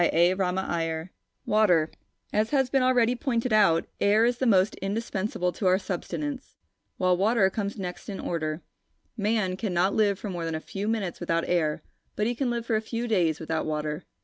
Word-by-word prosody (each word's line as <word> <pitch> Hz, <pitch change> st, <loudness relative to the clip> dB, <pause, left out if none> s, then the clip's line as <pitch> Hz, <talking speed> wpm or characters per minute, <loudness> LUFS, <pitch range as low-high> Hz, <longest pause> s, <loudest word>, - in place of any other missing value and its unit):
CHAPTER 175 Hz, +2 st, +4 dB
IV 175 Hz, -3 st, -1 dB, 0.4 s
WATER 180 Hz, -7 st, +3 dB, 0.4 s
As 215 Hz, +1 st, +2 dB
has 265 Hz, -3 st, +1 dB
been 270 Hz, -, +3 dB
already 250 Hz, -2 st, +3 dB
pointed 245 Hz, -3 st, -1 dB
out, 195 Hz, -6 st, +4 dB
air 210 Hz, +3 st, +4 dB
is 240 Hz, +1 st, +1 dB
the 260 Hz, -, +1 dB
most 195 Hz, -2 st, +4 dB
indispensable 195 Hz, -2 st, -2 dB
to 190 Hz, -, -2 dB
our 185 Hz, +1 st, +5 dB
subsistence, 255 Hz, -, -5 dB, 0.4 s
while 185 Hz, -1 st, +3 dB
water 200 Hz, +1 st, +3 dB
comes 205 Hz, +1 st, -3 dB
next 180 Hz, 0 st, -6 dB
in 195 Hz, -, -5 dB
order. 155 Hz, -1 st, -3 dB, 0.5 s
Man 210 Hz, -3 st, 0 dB
cannot 190 Hz, -2 st, 0 dB
live 205 Hz, -2 st, +2 dB
for 205 Hz, 0 st, -5 dB
more 175 Hz, -2 st, -4 dB
than 165 Hz, -1 st, -2 dB
a -, -, -2 dB
few 195 Hz, +5 st, -5 dB
minutes 210 Hz, -6 st, -2 dB
without 165 Hz, 0 st, -1 dB
air, 155 Hz, -4 st, 0 dB, 0.3 s
but 210 Hz, -, 0 dB
he 240 Hz, -, +1 dB
can 250 Hz, +1 st, -1 dB
live 235 Hz, -1 st, -2 dB
for 230 Hz, -, 0 dB
a 215 Hz, -, +1 dB
few 230 Hz, +2 st, -4 dB
days 175 Hz, -8 st, +1 dB
without 160 Hz, 0 st, -2 dB
water. 150 Hz, +1 st, -3 dB
195 Hz, 185 wpm, -27 LUFS, 175-225 Hz, 0.5 s, our